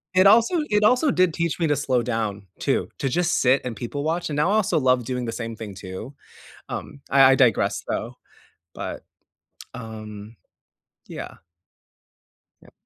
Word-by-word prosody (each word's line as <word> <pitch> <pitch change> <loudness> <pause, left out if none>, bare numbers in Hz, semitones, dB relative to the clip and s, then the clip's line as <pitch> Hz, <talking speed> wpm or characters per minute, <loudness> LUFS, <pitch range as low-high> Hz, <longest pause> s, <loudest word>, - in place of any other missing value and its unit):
it 185 +1 +6
also 230 - +5
it 210 0 +2
also 255 +6 +4
did 185 -6 +2
teach 170 0 -2
me 165 - +2
to 150 - +2
slow 130 -3 +1
down 110 -4 -3
too, - - 0
to 135 - 0
just 175 +4 +1
sit 130 +2 +4
and 125 -2 -4
people 120 +6 -5
watch, 165 +3 -1
and 145 - -3
now 150 +5 +2
I - - +3
also 205 -6 +2
love 130 -2 +2
doing 125 0 -3
the 115 - -3
same 115 -1 -5
thing 105 -3 -8
too, 95 +8 -8 0.5
um, - - -6
I 135 -1 +7
I - - +4
digress, 125 -6 +2
though, - - -3 0.6
but, - - -6 0.7
um, 110 -2 -9 0.7
yeah. - - -8 1.3
Yep. - - -19
130 Hz, 170 wpm, -23 LUFS, 115-170 Hz, 1.3 s, I